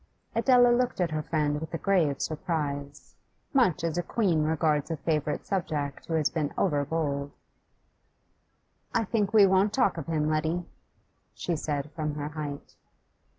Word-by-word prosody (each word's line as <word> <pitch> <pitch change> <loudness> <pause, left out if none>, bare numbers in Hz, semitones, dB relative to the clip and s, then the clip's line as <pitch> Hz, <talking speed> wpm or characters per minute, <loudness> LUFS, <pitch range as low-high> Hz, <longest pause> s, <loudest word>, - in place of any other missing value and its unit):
Adela 245 +1 +5
looked 245 -2 +1
at 175 -3 +1
her 155 0 -1
friend 150 -1 -1
with 160 +1 -5
a - - 0
grave 165 -8 +1
surprise, 145 -4 -3 0.4
much 240 - +3
as 165 0 0
a - - +2
queen 175 -3 +1
regards 155 -1 +1
a 165 - -2
favourite 150 -1 -1
subject 150 -7 -3
who 165 - -1
has 155 -2 +2
been 150 -3 -2
over 145 -6 +2
bold. 145 -2 -2 1.7
'I 230 - +3
think 210 -1 0
we 215 -3 +7
won't 195 +2 +3
talk 230 -9 +2
of 145 - -7
him, 155 -2 0
Letty,' 160 +3 0 0.7
she 175 - -2
said 150 -1 -3
from 150 -1 -3
her 145 0 -4
height. 145 -2 -6
160 Hz, 155 wpm, -28 LUFS, 150-185 Hz, 1.7 s, we